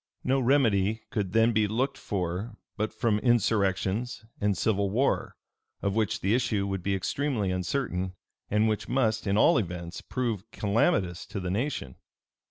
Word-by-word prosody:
No 135 +1 +2
remedy 110 -6 +2
could 100 -4 -1
then 115 +3 +4
be 105 -1 +3
looked 130 +6 0
for 95 +2 -3 0.2
but 110 +1 -1
from 110 -1 +1
insurrections 110 -1 +1
and 100 -2 +1
civil 100 -1 +1
war, 125 +8 0 0.5
of 100 - +1
which 110 -2 0
the 100 +3 +2
issue 110 -5 +1
would 95 -1 -2
be 100 +2 0
extremely 105 +1 -1
uncertain, 90 -1 -2 0.3
and 105 +2 +3
which 110 -1 -1
must, 110 -4 +1
in 100 +1 +2
all 110 - +5
events, 85 -3 -5
prove 115 -5 -3
calamitous 100 -4 +1
to - - -5
the 90 -1 -3
nation. 105 - -2
105 Hz, 155 wpm, -28 LUFS, 95-115 Hz, 0.5 s, all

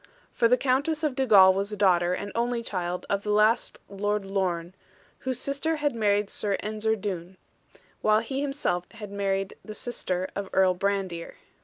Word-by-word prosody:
For 235 - +3
the 250 +2 +4
Countess 285 +5 0
of 300 -3 +1
Dugal 210 -8 +6
was 200 +1 -2
daughter, 180 -3 +3
and 205 +2 -5
only 235 0 -1
child, 180 -4 -3
of 200 0 0
the 210 - -5
last 215 +3 +3
Lord 205 +1 -2
Lorne, 185 -3 -2 0.5
whose 260 -2 -2
sister 280 +5 -1
had 295 -2 0
married 205 -2 +1
Sir 200 -2 0
Ensor 215 +1 -1
Doone; 190 -3 -5 0.6
while 215 0 +4
he 265 +4 -3
himself 275 -11 -1
had 210 -3 -9
married 195 -1 -1
the 215 - -8
sister 185 -7 -1
of 200 -1 -4
Earl 190 -1 +4
Brandir. 190 -3 -2
205 Hz, 165 wpm, -27 LUFS, 190-235 Hz, 0.6 s, Dugal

